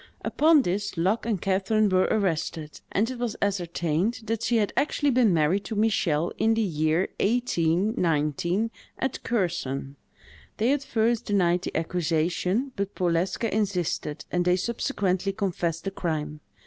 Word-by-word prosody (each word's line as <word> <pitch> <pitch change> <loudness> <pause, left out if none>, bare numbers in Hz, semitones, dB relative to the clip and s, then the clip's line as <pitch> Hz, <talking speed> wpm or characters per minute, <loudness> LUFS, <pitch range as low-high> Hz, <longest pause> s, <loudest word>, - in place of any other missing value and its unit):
Upon 310 -2 +4
this, 195 0 -2
Luck 195 +7 +1
and 215 -5 0
Catherine 200 +3 +1
were 185 -1 +3
arrested; 165 -6 -1
and 210 +4 +1
it 255 - -7
was 235 -3 -2
ascertained 180 +2 -1
that 225 0 -2
she 230 0 +1
had 210 -2 0
actually 290 -1 +1
been 245 -4 +4
married 170 +4 +2
to 220 - -4
Michel 175 -7 +1
in 225 0 +3
the 225 - +1
year 160 -1 +1
1819, 175 - +1 0.3
at 265 +1 -2
Kherson. 165 - -2 0.6
They 230 +5 +3
at 285 -1 -1
first 230 -3 0
denied 180 -3 +2
the - - -3
accusation, 175 - 0
but 200 0 -3
Powleska 180 +5 0
insisted, 180 -7 -1
and 175 0 +1
they 180 0 +3
subsequently 195 -2 -1
confessed 175 -5 -2
the 195 - -3
crime. 155 -5 -3
190 Hz, 145 wpm, -26 LUFS, 170-225 Hz, 0.6 s, Upon